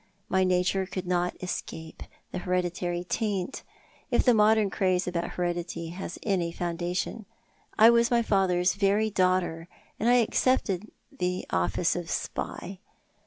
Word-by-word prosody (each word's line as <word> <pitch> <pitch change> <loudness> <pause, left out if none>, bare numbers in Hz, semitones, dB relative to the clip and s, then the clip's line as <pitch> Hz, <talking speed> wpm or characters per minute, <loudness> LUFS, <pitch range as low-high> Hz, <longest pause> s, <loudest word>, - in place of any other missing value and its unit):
My 190 0 +3
nature 185 +1 +1
could 185 0 -5
not 180 0 0
escape 160 -3 -6 0.3
the 185 - -3
hereditary 175 -1 -1
taint— 205 +2 -2 0.5
if - - +3
the 250 - +5
modern 215 -2 +4
craze 185 -2 +1
about 170 -1 -2
heredity 175 -1 -3
has 180 0 -6
any 180 -5 0
foundation. 175 +5 -3 0.5
I 225 +2 +8
was 235 0 +4
my 235 -1 +3
father's 185 -4 +2
very 205 +2 +2
daughter, 185 -4 +1 0.3
and 230 - +2
I 245 - +6
accepted 220 -4 +1 0.3
my 180 0 0
office 90 - +1
of 175 -2 -4
spy. 185 +3 -4
185 Hz, 135 wpm, -27 LUFS, 175-205 Hz, 0.5 s, I